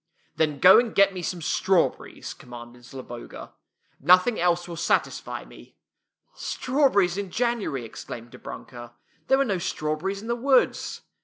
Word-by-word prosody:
" - - -41
Then 155 -2 +1
go 180 +6 +8
and 235 -2 -2
get 200 0 +5
me 185 - -5
some 175 -1 -4
strawberries," 185 +2 0
commanded 120 0 -12
Zloboga. 125 -2 -9 0.3
" - - -43
Nothing 180 - +4
else 175 0 +1
will 170 - -6
satisfy 165 - -1
me." - - -16 0.6
"Strawberries 250 -10 +1
in 200 -2 -4
January!" 220 - -1
exclaimed 115 +1 -9
Dobrunka. 120 -1 -10 0.2
" - - -38
There 265 - +4
were 275 - +2
no 195 -6 -1
strawberries 165 +5 -2
in 220 - -9
the 235 - 0
woods." 260 +2 +1
180 Hz, 155 wpm, -25 LUFS, 135-215 Hz, 0.6 s, go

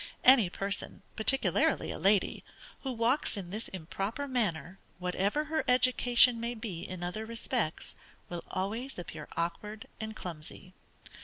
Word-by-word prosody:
Any 250 -8 +8
person, 195 +1 -3
particularly 265 +5 +2
a - - -5
lady, 195 -1 +3 0.4
who 265 - -4
walks 235 +1 +2
in 180 -3 -6
this 215 +3 -4
improper 195 - -4
manner, 195 - -1 0.2
whatever 185 +9 0
her 315 +1 -1
education 250 -1 +5
may 235 +1 -2
be 215 -7 -5
in 180 0 -6
other 180 +5 -3
respects, 230 -5 -2 0.3
will 175 -1 -5
always 220 +8 -3
appear 160 -3 -7
awkward 210 +6 -3
and 220 0 -5
clumsy. 175 +1 -8
215 Hz, 135 wpm, -31 LUFS, 180-245 Hz, 0.4 s, Any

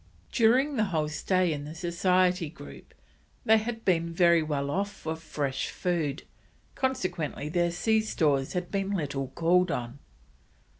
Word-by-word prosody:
During 255 +5 +3
the 215 - +3
whole 160 -6 -1
stay 180 +2 +1
in 145 -1 -5
the 150 +2 -8
Society 180 0 +1
Group 70 - -13 0.5
they 220 0 +6
had 225 +1 -5
been 170 -3 +2
very 170 -1 +4
well 140 -2 -2
off 200 +4 -1
for 160 -4 -5
fresh 145 -4 -3
food, 160 -6 -2 0.5
consequently 180 - -2
their 175 +1 +1
sea 220 +6 +1
stores 145 -10 0
had 180 -1 -3
been 195 0 -1
little 140 -5 -2
called 175 +5 +2
on. 125 -1 -4
170 Hz, 145 wpm, -28 LUFS, 150-195 Hz, 0.5 s, they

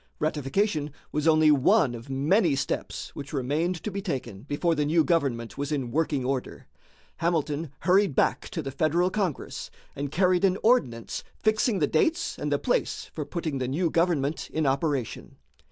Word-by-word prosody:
Ratification 150 +2 0 0.2
was 150 +1 -1
only 155 -1 +6
one 135 -2 +4
of 120 +2 -9
many 150 +5 +2
steps 135 - -3
which 140 +1 -7
remained 155 +6 -1
to 210 - -3
be 200 +1 -3
taken 125 - -4
before 145 +6 0
the 150 -2 +1
new 160 +2 +3
government 140 -8 0
was 145 +1 -2
in 135 -5 -2
working 145 -3 0
order. 130 -1 -3 0.5
Hamilton 160 -2 -1
hurried 190 -4 +3
back - - +1
to 160 - -4
the 135 - -4
Federal 160 +6 +1
Congress, 190 -8 -3 0.3
and 140 0 -4
carried 180 +2 +2
an 190 -1 +3
ordinance 130 - +1 0.2
fixing 215 0 +2
the 155 - +3
dates 315 - 0
and - - -2
the - - +3
place - - -1
for - - -4
putting 160 -6 -3
the 130 - -1
new 160 +5 0
government 165 -4 0
in 160 -1 0
operation. 135 -2 -1
155 Hz, 170 wpm, -27 LUFS, 140-175 Hz, 0.5 s, only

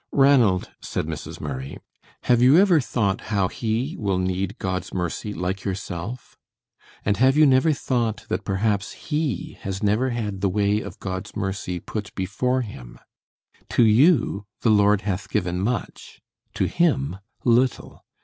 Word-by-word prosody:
"Ranald," 125 -9 +4
said - - -3
Mrs. 80 -1 -6
Murray, 65 -1 -5 0.5
"have 120 -1 +3
you 130 +5 +7
ever 180 -5 +5
thought 100 -6 -1
how 100 -3 +2
he 120 +6 -2
will 100 -3 0
need 95 +1 -2
God's 95 -1 -3
mercy 90 +4 -3
like 95 0 -3
yourself? 95 +4 -5 0.7
And 100 -1 +1
have 130 +5 +4
you 155 - +7
never 135 +3 +4
thought 120 -6 -1
that 100 - -2
perhaps 100 +1 -1
he 150 - -3
has 95 +1 -4
never 105 +6 +2
had 105 -5 -3
the 100 - +2
way 105 +2 +1
of 100 -3 -9
God's 95 +1 -5
mercy 95 -2 -3
put 105 +4 -6
before 120 +7 0
him? 65 - -9 0.7
To 120 - +4
you 115 - +3
the 115 - +3
Lord 105 -1 +4
has 100 -1 -3
given 90 -3 -1
much, 115 +1 -4 0.4
to - - +1
him 140 - +1 0.3
little. 125 +1 +1
105 Hz, 150 wpm, -23 LUFS, 95-125 Hz, 0.7 s, you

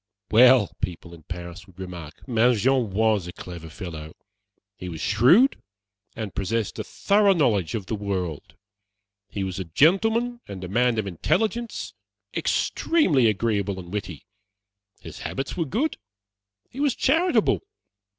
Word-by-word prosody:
"Well," 125 -1 +6
people 90 -2 -5
in 85 - -13
Paris 90 +2 -7
would 95 - -20
remark, 90 - -9
"Mangin 120 0 +2
was 105 -2 +1
a - - -5
clever 85 -3 -9
fellow. 80 -3 -8 0.6
He 90 -2 -7
was 80 -2 -7
shrewd, 130 - +4 0.5
and 110 -4 -5
possessed 105 +2 -2
a - - -2
thorough 200 0 +3
knowledge 105 - +1
of 105 -4 -4
the 110 - -4
world. 95 -7 -4 0.7
He 100 - -3
was 95 -1 -4
a - - -2
gentleman 225 - +2
and 95 -2 -7
a - - -4
man 120 +4 +2
of 110 - 0
intelligence, 220 - -1 0.4
extremely 165 - +2
agreeable 100 -2 0
and 90 +1 -10
witty. 95 -6 -5 0.8
His - - -10
habits 135 0 -4
were 170 - -1
good; 250 - -1 0.7
he 265 - -11
was 285 -3 +2
charitable. 330 +7 +2
105 Hz, 140 wpm, -24 LUFS, 90-140 Hz, 0.8 s, Well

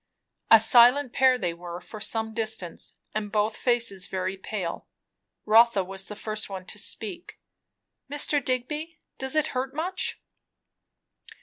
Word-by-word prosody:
A 225 - +9
silent 245 +4 +6
pair 260 -1 +4
they 175 -8 -2
were 175 0 -8
for 215 - -11
some 220 +1 -1
distance; 220 -6 -3 0.2
and 210 -1 -3
both 215 +1 0
faces 235 -7 +1
very 185 0 -3
pale. 190 -2 -5 0.6
Rotha 220 -2 +5
was 190 +1 -6
the 210 - -7
first 215 0 -4
one 190 -2 -7
to - - -6
speak. 360 -4 -2 0.7
"Mr. 290 0 +1
Digby 300 +6 -3 0.2
does 265 +2 0
it 310 0 +2
hurt 260 +1 -3
much?" 360 +4 -2
225 Hz, 135 wpm, -26 LUFS, 195-260 Hz, 0.7 s, A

